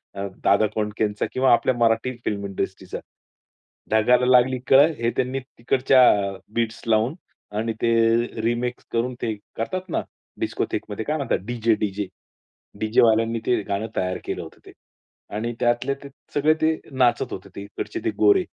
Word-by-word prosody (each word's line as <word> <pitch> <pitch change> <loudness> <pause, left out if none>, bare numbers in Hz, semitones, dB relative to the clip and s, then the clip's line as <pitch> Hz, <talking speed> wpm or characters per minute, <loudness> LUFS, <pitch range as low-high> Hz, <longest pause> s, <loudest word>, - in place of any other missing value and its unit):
अ, 100 0 -3 0.2
दादा 105 +2 +4
कोंडकेचा 105 -1 -1
किंवा 130 0 +4
आपल्या 125 +2 +2
मराठी 115 +2 +2
फिल्म 100 -1 -2
इंडस्ट्रीचं. 95 -1 -4 0.9
ढगाला 125 +3 +4
लागली 125 0 +4
कळ 140 +2 +8
हे 115 - +1
त्यांनी 130 +1 0
तिकडच्या 130 0 +3
अ, 100 -1 -1 0.2
बीट्स 115 -1 -1
लावून 115 +5 +2 0.4
आणि 115 +1 -1
ते 115 - +2 0.5
रिमिक्स 120 +2 -1
करून 120 +2 0
ते 110 -2 -1 0.2
करतात 185 +11 -3
ना - - 0 0.4
डिस्कोथेकमध्ये 105 +1 -3
काय 155 +1 0
म्हणतात 140 -5 0
डी-जे, 115 -1 +1
डी-जे. 105 -1 -2 0.7
डीजे 110 +1 +3
वाल्यांनी 115 0 +3
ते 120 -3 +2
गाणं 100 +3 -2
तयार 90 0 -1
केलं - - -3
होतं - - -13
ते - - -12 0.6
आणि 115 +3 -2
त्यातले 120 +3 +1
ते 140 - -9 0.2
सगळे 150 +2 +4
ते 160 0 +3 0.2
नाचत 125 -2 +2
होते 95 +1 -8
तिकडचे 100 - -6
ते 335 - +2
गोरे. 390 -2 +5
115 Hz, 150 wpm, -23 LUFS, 110-130 Hz, 0.9 s, कळ